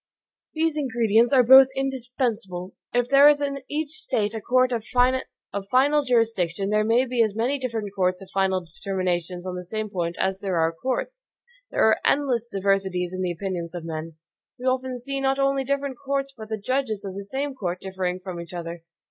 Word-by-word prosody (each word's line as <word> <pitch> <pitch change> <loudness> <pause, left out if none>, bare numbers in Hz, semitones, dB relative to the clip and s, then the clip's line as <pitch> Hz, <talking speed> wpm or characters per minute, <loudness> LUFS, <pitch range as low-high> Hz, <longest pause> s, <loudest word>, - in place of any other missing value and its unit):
These 320 -1 +1
ingredients 235 -4 +2
are 260 -3 +6
both 265 +2 +9
indispensable. 245 -8 -2 0.2
If 245 0 +1
there 275 +2 +7
is 295 -1 +3
in 280 -1 -2
each 300 0 -2
State 220 -8 -1
a 220 - -4
court 255 +3 +3
of 230 -3 -1
final 255 +2 +1
jurisdiction, 220 - +1
there 210 0 +3
may 230 +4 +3
be 245 -2 0
as 215 -3 +1
many 250 +6 0
different 225 -5 -3 0.4
final 190 -2 +1
determinations 180 0 -3
on 185 -1 -4
the 180 - -5
same 215 +3 -4
point 170 -2 -2
as 190 0 0
there 190 -3 -2
are 165 0 +2
courts. 265 - -4 0.4
There - - +1
are 220 - +4
endless 250 -5 +1
diversities 190 -3 0
in 185 - -3
the 180 -1 0
opinions 175 -1 -4
of 170 -2 -6
men. 160 0 -5 0.4
We 250 - -8
often 260 0 0
see 275 +3 -4
not 270 0 +1
only 275 0 +1
different 280 -1 -2
courts 275 0 -2
but 220 -2 -10
the 220 - -2
judges 225 -2 -1
of 195 - -5
the 200 +1 -7
came 280 +1 -2
court 185 -8 -3
differing 185 -1 -3
from 180 -2 -6
each 170 +1 -9
other. 170 -1 -6
225 Hz, 185 wpm, -24 LUFS, 185-265 Hz, 0.4 s, both